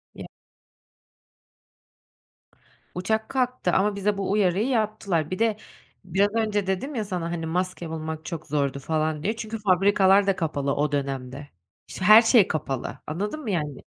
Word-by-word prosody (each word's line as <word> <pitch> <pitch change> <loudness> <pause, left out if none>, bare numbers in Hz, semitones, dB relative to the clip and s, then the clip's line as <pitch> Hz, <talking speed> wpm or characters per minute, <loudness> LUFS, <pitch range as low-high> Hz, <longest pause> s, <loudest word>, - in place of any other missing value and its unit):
Ya - - -8 2.7
Uçak 220 +4 -1
kalktı 250 -8 0
ama 200 +1 +2
bize 200 +1 0
bu 195 -1 -2
uyarıyı 200 +1 +2
yaptılar. 215 - -1
Bir 185 - -3
de 225 -2 +1 0.5
biraz 190 +3 +2
önce 210 -3 0
dedim 220 +10 -2
ya 220 - -2
sana, 175 -4 -3
hani, 165 -1 -3
maske 180 0 -3
bulmak 160 0 -5
çok 165 -3 -6
zordu 140 -2 -1
falan 155 +1 -1
diye 215 +3 0
çünkü 220 0 -6
fabrikalar 195 0 +4
da 195 - +3
kapalı 145 -4 -1
o 145 0 0
dönemde. 135 0 -4 0.4
İşte, 190 - -5
her 215 +2 +9
şey 225 -3 +5
kapalı, 135 -4 -4
anladın 205 - -3
mı, 230 -8 -3
yani? 150 -6 -3
185 Hz, 150 wpm, -25 LUFS, 155-210 Hz, 2.7 s, her